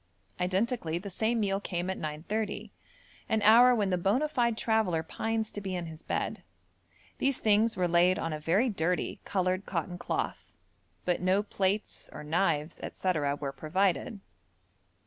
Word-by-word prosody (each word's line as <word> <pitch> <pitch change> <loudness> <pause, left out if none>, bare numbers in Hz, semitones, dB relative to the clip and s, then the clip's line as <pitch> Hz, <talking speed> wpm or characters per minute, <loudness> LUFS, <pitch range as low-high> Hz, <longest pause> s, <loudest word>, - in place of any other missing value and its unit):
Identically 185 -1 0
the 195 +3 -7
same 225 +5 0
meal 195 -2 +1
came 175 -3 -3
at 190 - -3
9.30, 180 +8 -3 0.6
an 220 -1 +1
hour 240 +4 +7
when 205 -4 +1
the 180 - +1
bona 215 - +2
fide 240 -6 +1
traveller 215 -9 +1
pines 220 +5 -2
to 205 - -6
be 190 -2 -3
in 175 -1 -3
his 160 -1 -9
bed. - - -2 0.8
These 275 -1 +2
things 220 +1 +3
were 180 -1 +2
laid 175 +2 +4
on 165 -5 -2
a 155 - -4
very 180 +11 +2
dirty 180 -5 -1
coloured 185 0 0
cotton 175 0 -3
cloth, - - -3 0.5
but 180 -1 +1
no 185 +3 +2
plates 200 0 -2
or - - -8
knives, 160 -1 0 0.2
&c. 190 - -1 0.3
were 140 -2 -3
provided. 185 - 0
190 Hz, 155 wpm, -30 LUFS, 175-220 Hz, 0.8 s, hour